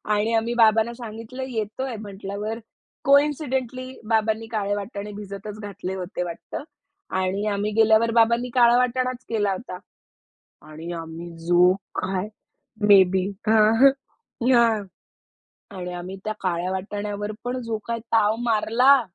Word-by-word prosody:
आणि 220 +2 0
आम्ही 230 +1 0
बाबांना 225 +1 +4
सांगितलं 230 +2 -7
येतोय 230 +2 -3
म्हंटल्यावर 205 +2 -5 0.5
कोइन्सिडेंटली 265 -3 +1 0.2
बाबांनी 220 0 +1
काळे 205 -2 -1
वाटाणे 205 0 -5
भिजतच 205 +1 -8
घातले 200 -2 -6
होते 180 0 -4
वाटतं. 175 +10 -6 0.6
आणि 190 +3 -1
आम्ही 205 +1 -1
गेल्यावर 220 +1 +4
बाबांनी 235 +2 +3
काळा 240 -1 +6
वाटाणाच 255 0 0
केला 205 -3 +1
होता. 185 -2 -7 0.9
आणि 155 +3 -9
आम्ही 165 +1 -7 0.2
जो 175 +1 +5 0.3
काय 190 +2 -2 0.6
मे 200 -2 +9
बी 190 0 +1 0.2
हां, 220 0 +5
हां. 275 - +9 0.6
ना 235 -2 +6 1.1
आणि 180 0 -5
आम्ही 180 +2 -6
त्या 215 0 -2
काळ्या 180 0 -1
वाटाण्यावर 205 +2 -4
पण 250 +1 -3
जो 225 -1 -2
काही 230 0 -2
ताव 220 -1 +4
मारला. 245 +5 +4
215 Hz, 130 wpm, -24 LUFS, 195-235 Hz, 1.1 s, मे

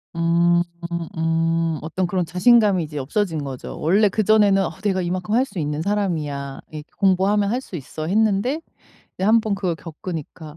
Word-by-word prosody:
음음음. 170 -1 0
어떤 165 +4 -2
그런 180 -1 -1
자신감이 195 +1 +4
이제 150 -1 -7
없어진 160 +2 -1
거죠. 135 -2 -7
원래 200 +6 +3
그전에는 205 -1 +3
'어 - - -3
내가 190 -3 +1
이만큼 180 +4 -2
할 260 +2 +3
수 205 - -12
있는 150 0 -2
사람이야. 155 -9 -2
이렇게 155 0 -9
공부하면 200 +1 +2
할 250 +3 -1
수 190 - -10
있어.' 155 +3 -6
했는데 220 - +1 0.6
이제 190 - -2
한번 220 -1 +3
그걸 185 -4 -1
겪으니까 160 -2 -8
175 Hz, 350 characters per minute, -22 LUFS, 160-200 Hz, 0.6 s, 자신감이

